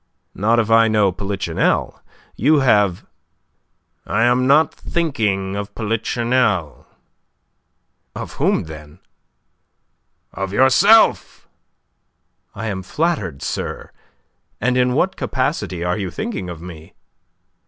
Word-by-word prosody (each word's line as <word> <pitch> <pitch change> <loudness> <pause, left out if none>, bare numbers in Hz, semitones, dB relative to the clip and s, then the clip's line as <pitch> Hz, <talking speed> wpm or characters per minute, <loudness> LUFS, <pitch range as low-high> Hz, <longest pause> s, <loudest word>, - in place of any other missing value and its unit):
"Not 110 +4 +1
if 115 -1 +1
I 115 0 +6
know 105 -3 +2
Polichinelle. 95 -3 -2 0.3
You 145 +5 +3
have..." 105 -8 +2 1.0
"I 115 - +1
am 125 +1 +2
not 150 +4 +4
thinking 105 - -2
of 100 0 -6
Polichinelle." 115 - -1 1.3
"Of - - -7
whom, - - +2
then?" 75 -2 -11 1.4
"Of 95 0 -4
yourself." 160 - +4 1.1
"I 110 - -5
am 100 -3 -3
flattered, 100 - -2
sir. - - -5 0.7
And 125 +3 0
in 125 0 +2
what 190 +6 +1
capacity 130 - -2
are 90 +4 -1
you 95 -2 -3
thinking 215 - -5
of 85 -1 -8
me?" 80 -3 -11
110 Hz, 105 wpm, -19 LUFS, 95-130 Hz, 1.4 s, I